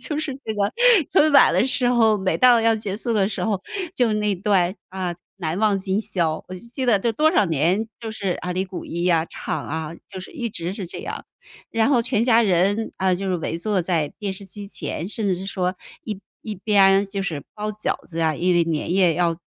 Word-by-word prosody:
就 300 - -3
是 305 -3 -2
这 220 - -2
个 200 -1 0 0.4
春 310 -4 +5
晚 280 - +7
的 - - +3
时 250 -1 +3
候， 225 -3 +4
每 190 -1 0
到 245 -2 +6
要 225 0 +3
结 205 -2 -4
束 230 +1 -2
的 200 -2 +2
时 - - -3
候， 205 -4 0 0.3
就 240 -4 +2
那 210 -1 0
段， 185 -1 +1
啊， 185 -2 -3 0.2
《难 170 -1 -3
忘 210 -2 +3
今 190 +1 0
宵》。 170 -7 0
我 185 - -7
就 180 - -8
记 260 0 -3
得 220 -5 +4
这 230 +4 0
多 310 +7 +3
少 210 - +4
年， 170 +8 +1
就 225 -2 -5
是， 200 -3 -3
啊， 180 0 -2
李 185 +1 -1
谷 190 -1 -7
一 170 +2 -3
啊， 165 -2 +3
唱， - - -4
啊， 160 +1 -4
就 185 - -8
是 - - -10
一 245 -7 -3
直 175 -3 -4
是 195 -2 -6
这 - - -8
样。 - - -6 0.5
然 225 +1 +2
后 265 -4 +4
全 230 -1 +1
家 235 -2 +5
人， 200 +3 +1
啊， 190 -1 +2
就 195 +2 -3
是 185 - +1
围 165 0 -3
坐 195 0 0
在 165 -4 0
电 200 -3 -3
视 195 +1 -10
机 200 +2 -9
前， 175 -3 -5
甚 215 0 -2
至 190 - +2
是 185 - -7
说 185 -1 -1 0.3
一 210 -3 -5 0.2
一 215 -2 -5
边 195 0 +4
就 195 0 -4
是 160 -7 -4
包 210 0 -3
饺 215 0 -2
子 165 -1 -7
呀， 160 -2 +1
因 180 +2 +1
为 170 - +4
年 165 0 -2
夜 180 -4 +4
要 170 -1 +1
195 Hz, 250 characters per minute, -22 LUFS, 180-220 Hz, 0.5 s, 晚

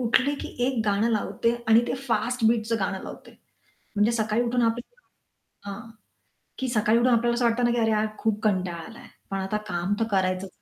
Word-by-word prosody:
उठले 260 +4 +2
की - - -5 0.2
1 260 -3 0
गाणं 205 +2 +2
लावते 230 +1 0
आणि 225 +1 +7
ते - - -1
फास्ट 235 +2 0
बीटचं 230 0 +1
गाणं 190 0 -2
लावते. - - -10 0.7
म्हणजे 210 +3 +3
सकाळी 220 0 +1
उठून 245 0 0
आप 230 0 +2 0.9
हां, 220 +4 -7 0.7
की 265 - -1
सकाळी 225 -1 +3
उठून 245 +1 +3
आपल्याला 235 +1 +2
असं 240 0 +1
वाटतं 235 +1 +2
ना 240 - +3
की 240 - 0
"अरे 225 -1 +2
यार 215 0 +2
खूप 220 -2 0
कंटाळा 185 -5 0
आलाय, 230 - -12 0.2
पण 195 - -1
आता 195 +2 -1
काम 175 +1 -1
तर 225 - +2
करायचं" 185 -1 0
225 Hz, 190 wpm, -26 LUFS, 205-235 Hz, 0.9 s, आणि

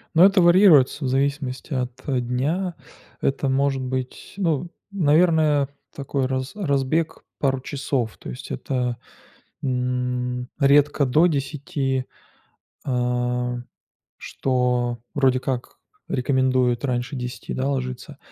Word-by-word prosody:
Ну, 170 - +7
это 195 -1 +5
варьируется 170 -6 +6
в - - +1
зависимости 135 +1 -1
от 125 -1 -2 0.3
дня. 160 +9 -1 0.5
Это 135 +1 0
может 135 0 +1
быть, 130 0 -5
ну, 170 -3 0 0.2
наверное, 155 -4 +3 0.3
такой 140 -1 -2
раз 130 0 -2
разбег 155 -3 0 0.2
пару 135 -2 +1
часов. 135 -4 -2
То - - -9
есть 60 - -8
это, 125 - -2 0.6
м, 125 -1 -1
редко 145 0 +4
до 155 +7 +4
10, 140 -3 -2 0.8
э, 125 -1 -1 0.6
что 125 -2 0
вроде 130 -3 +3
как 130 -1 -4 0.3
рекомендуют 130 -1 +1
раньше 125 +2 -2
10, 125 -1 -5
да, 135 +2 -1
ложиться. 130 +1 -4
130 Hz, 110 wpm, -23 LUFS, 125-145 Hz, 0.8 s, Ну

